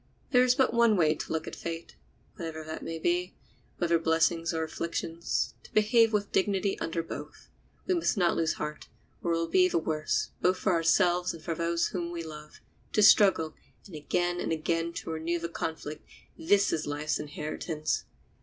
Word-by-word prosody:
There 250 -2 +6
is 250 0 +4
but 265 -3 +2
one 235 -3 +4
way 155 -3 +4
of - - -7
looking 160 -1 -3
at - - -5
fate—whatever 165 -1 -8
that 155 0 -6
may 165 - -5
be, 175 +2 0 0.4
whether 170 -1 +2
blessings 165 +1 +2
or 160 -1 -1
afflictions—to 165 +1 -3
behave 225 +1 +5
with 205 -2 -1
dignity 195 0 +1
under 165 0 -2
both. - - -9 0.4
We 370 - +1
must 335 -9 +1
not 175 -3 +3
lose 160 -1 +1
heart, 150 0 -6 0.3
or 170 - 0
it - - +1
will 165 0 -1
be 180 +2 +4
the - - +1
worse, 155 -1 -1
both 185 +1 +3
for 190 - +1
ourselves 175 +1 +2
and 160 - -13
for 165 - -2
those 170 +1 0
whom 175 -2 -3
we 170 -1 -4
love. 150 -1 -10 0.3
To 210 - +4
struggle, 190 -6 +6 0.3
and 185 - -11
again 175 +4 -1
and - - -2
again 165 +1 -1
to 165 - -5
renew 160 +2 -1
the 170 0 -4
conflict—this 160 +4 -2
is 155 - -2
life's 145 +1 -1
inheritance. 155 +1 -3
170 Hz, 175 wpm, -29 LUFS, 160-185 Hz, 0.4 s, There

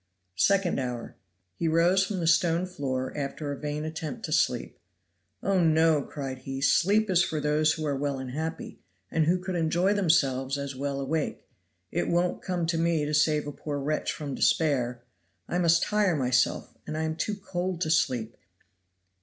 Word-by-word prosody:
Second 195 - +3
hour. 125 -2 -4 0.4
He 165 - 0
rose 170 +4 +4
from 195 -2 -3
the - - -1
stone 165 +1 +3
floor 130 -7 -3
after 145 +1 -4
a - - -3
vain 150 +1 -3
attempt 155 -2 -5
to - - -6
sleep. - - 0 0.6
"Oh, 195 -1 +2
no!" 160 -1 +4
cried 135 -2 -6
he, 135 +1 -5
"sleep 195 +11 +3
is 180 -1 +5
for 155 - -2
those 150 +1 +2
who 155 - -4
are 145 -2 0
well 140 0 -2
and 130 -1 -6
happy, 160 - -5 0.3
and 160 -1 +2
who 175 +2 +4
could 185 +1 -5
enjoy 175 +3 +2
themselves 140 -8 +2
as 140 -1 -5
well 140 +1 -3
awake; 145 +3 -2 0.4
it - - -1
won't 175 +1 +1
come 180 -2 -2
to 165 0 0
me 165 -2 +1
to 150 - -3
save 150 0 +3
a 145 - -4
poor 145 +1 -5
wretch 150 +2 -1
from 145 -3 -5
despair. 125 -8 +1 0.4
I 175 - -1
must 170 -1 +4
tire 210 -4 +2
myself, 125 -2 +1
and 155 - -3
I 160 - -1
am 160 0 -2
too 205 +6 -2
cold 185 -3 -3
to 155 - 0
sleep. 120 -7 +1
155 Hz, 180 wpm, -27 LUFS, 140-175 Hz, 0.6 s, is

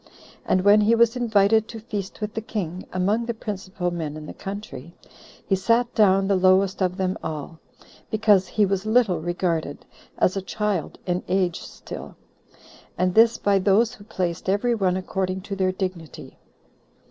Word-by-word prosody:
And 185 - +3
when 205 +1 +6
he 220 +3 +4
was 235 +1 +3
invited 220 -2 +3
to 225 - -8
feast 210 -2 -6
with 210 0 -3
the 220 - -3
king 185 -5 -5
among 205 +6 0
the 235 - -2
principal 190 -4 -4
men 155 -3 -4
in 155 - -8
the - - -8
country, 195 -6 -8 0.5
he 195 - +2
sat 230 +5 +1
down 195 -3 +4
the 200 - +2
lowest 190 +1 +3
of 180 0 0
them 190 +1 -1
all, 160 +1 -6 0.5
because 210 -3 +3
he 210 - +2
was 195 -1 -1
little 215 -5 +2
regarded, 170 -3 -2 0.3
as 185 - +2
a 195 - -1
child 200 -3 -2
in 180 0 -1
age 185 -2 0
still; - - -9 0.8
and 180 0 +1
this 225 +2 +5
by 200 -1 +2
those 205 +4 +3
who 205 - -13
placed 180 -3 -3
every 205 +5 +2
one 190 -5 +1
according 190 0 -3
to 200 +1 -6
their 190 -1 +1
dignity. 185 -4 -6
195 Hz, 170 wpm, -24 LUFS, 185-215 Hz, 0.8 s, when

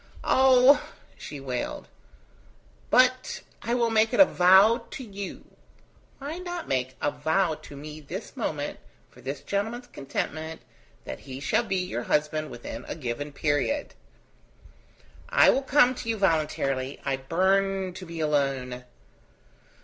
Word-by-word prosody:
"Oh!" 260 +1 +6 0.3
she 145 - -8
wailed. 130 -2 -4 1.0
"But 255 +1 +3 0.2
I 235 - -1
will 235 -2 +1
make 220 +2 +3
it - - -1
a 290 - +11
vow 205 +5 +5
to 265 - -7
you." 200 -3 -7 0.7
"Why 295 +5 -6
not 350 -2 -5
make 130 -1 0
it 130 - -22
a 145 - +2
vow 165 +1 +1
to 145 -2 -11
me 150 +2 -8
this 145 - -7
moment, - - -3 0.3
for 125 - -17
this 135 +3 -5
gentleman's 225 +5 -3
contentment, 155 - -5 0.4
that 65 - -6
he 130 -1 -8
shall 145 - +1
be 195 - -1
your 180 -10 -2
husband 150 +3 0
within 120 0 -7
a - - -4
given 145 0 -4
period?" 155 - -1 1.4
"I - - +6
will 270 - +1
come 270 -2 +4
to 230 - -6
you 225 - 0
voluntarily. 145 -7 0
I 135 -1 0
burn 190 +5 +1
to 190 - -9
be 165 -2 -6
alone." 135 -4 -1
170 Hz, 140 wpm, -27 LUFS, 140-230 Hz, 1.4 s, a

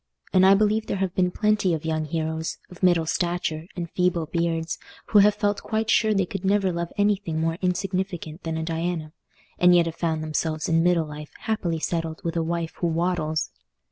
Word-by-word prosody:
And 185 0 +6
I 195 - +7
believe 215 +2 +2
there - - -1
have 190 -2 -1
been 180 -1 +2
plenty 205 -2 +1
of 155 - -7
young 155 -1 -1
heroes, 160 +1 -2
of 180 - -13
middle 175 -3 +4
stature 170 -1 -1
and 175 -1 -3
feeble 180 -2 +1
beards, 165 0 -1 0.3
who 210 - +6
have 205 +1 +5
felt 205 -1 0
quite 220 0 -1
sure 220 -1 +4
they 195 -3 +2
could 195 +1 -6
never 195 -1 +2
love 170 0 -3
anything 200 -5 +1
more 165 +1 -1
insignificant 180 -3 -2
than 160 -1 -3
a 160 - -2
Diana, 165 -1 -3 0.5
and 180 0 +6
yet 170 -1 +5
have 165 - -3
found 160 -1 -1
themselves 155 0 -1
in 165 0 +3
middle 170 -1 +3
life 150 0 -9
happily 200 -7 -1
settled 165 0 -2
with 170 0 -2
a 165 - +1
wife 165 0 -2
who 175 - 0
waddles. 165 -2 0
170 Hz, 200 wpm, -25 LUFS, 160-190 Hz, 0.5 s, I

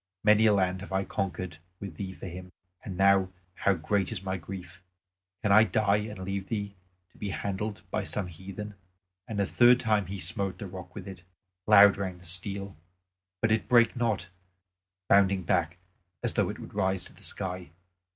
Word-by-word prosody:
Many 105 +1 +5
a 105 - +5
land 95 -1 0
have 100 - -9
I 95 0 +1
conquered 90 -4 -4 0.2
with 95 -6 -8
thee 95 -2 -4
for 95 - -10
him, 90 0 -8 0.3
and 95 -4 -6
now 95 -1 +4 0.2
how 100 +1 +1
great 95 +5 0
is 100 -4 -4
my 95 -1 -2
grief! 90 0 -9 0.6
Can 105 - +2
I 110 +2 +8
die 110 -2 +2
and 105 0 -5
leave 95 +1 -4
thee 100 -3 -3 0.4
to - - -22
be 105 - -3
handled 100 +2 -4
by - - -1
some 105 - -3
heathen?" 95 +4 -8 0.5
And 110 -3 -5
the 100 - +2
third 120 +4 +5
time 105 -5 +1
he 100 +2 -5
smote 100 -1 -1
a - - -5
rock 90 -1 -10
with - - -7
it. 95 -2 -9 0.5
Loud 100 -1 +8
rang 95 -3 -4
the 90 - -15
steel, 100 +3 0 0.7
but 110 - +2
it 110 -4 +1
brake 120 -1 +5
not, 120 -5 -1 0.8
bounding 100 -1 +4
back 85 0 0 0.5
as - - 0
though - - +1
it - - -5
would - - -10
rise 95 -1 +1
to - - -14
the - - -19
sky. 90 -3 -3
100 Hz, 190 wpm, -28 LUFS, 95-105 Hz, 0.8 s, I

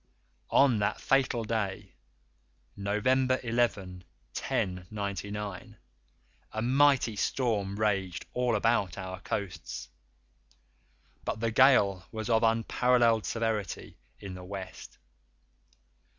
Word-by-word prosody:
_" - - -41 0.5
On 130 -6 +4
that 100 - 0
fatal 130 -4 +2
day, 100 -4 -3 0.8
November 130 +6 +1
11, 105 -6 -1 0.3
1099, 100 +1 -4 0.8
a 110 - -2
mighty 130 -2 +4
storm 100 -3 0
raged 100 -4 0
all 125 -2 +1
about 105 -5 +1
our 95 -1 -6
coasts, 100 -3 -5 1.3
but - - -3
the 115 0 0
gale 110 -8 +5
was 110 0 -3
of 110 -1 +4
unparalleled 115 0 +3
severity 110 -5 -3 0.2
in 95 -2 -7
the 90 0 -9
West. 95 0 -8
110 Hz, 95 wpm, -29 LUFS, 100-120 Hz, 1.3 s, gale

